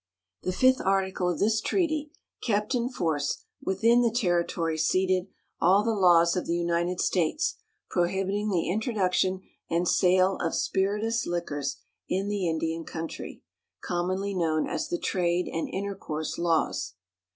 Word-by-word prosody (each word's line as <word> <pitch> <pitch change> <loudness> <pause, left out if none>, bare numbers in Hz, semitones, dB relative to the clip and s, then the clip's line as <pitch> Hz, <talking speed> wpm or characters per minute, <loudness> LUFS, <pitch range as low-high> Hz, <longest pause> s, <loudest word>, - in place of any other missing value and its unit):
The 185 - -1
fifth 260 +7 +3
article 190 -2 +1
of 175 - -1
this 215 +1 +2
treaty 310 -5 0 0.3
kept 210 +1 0
in 245 -1 0
force, 160 - -1 0.2
within 230 +5 +3
the 235 - +3
territory 175 -7 0
ceded, 185 +3 +1 0.3
all 190 +4 +4
the 225 0 +1
laws 175 -4 +5
of 180 - -2
the 170 - +1
United 175 +1 0
States 180 - +1 0.3
prohibiting 195 +4 0
the 175 -5 0
introduction 190 -2 0 0.3
and 170 +2 +1
sale 185 +1 +3
of - - -1
spirituous 210 +5 0
liquors 145 -5 -2 0.3
in 195 +2 0
the 200 -4 0
Indian 165 0 -2
country, 160 0 -7 0.4
commonly 185 +3 -1
known 160 -4 0
as - - -2
the 175 - -1
trade 175 -1 0
and 165 - -3
intercourse 190 -6 -4
laws. 165 - 0
185 Hz, 140 wpm, -27 LUFS, 170-205 Hz, 0.4 s, laws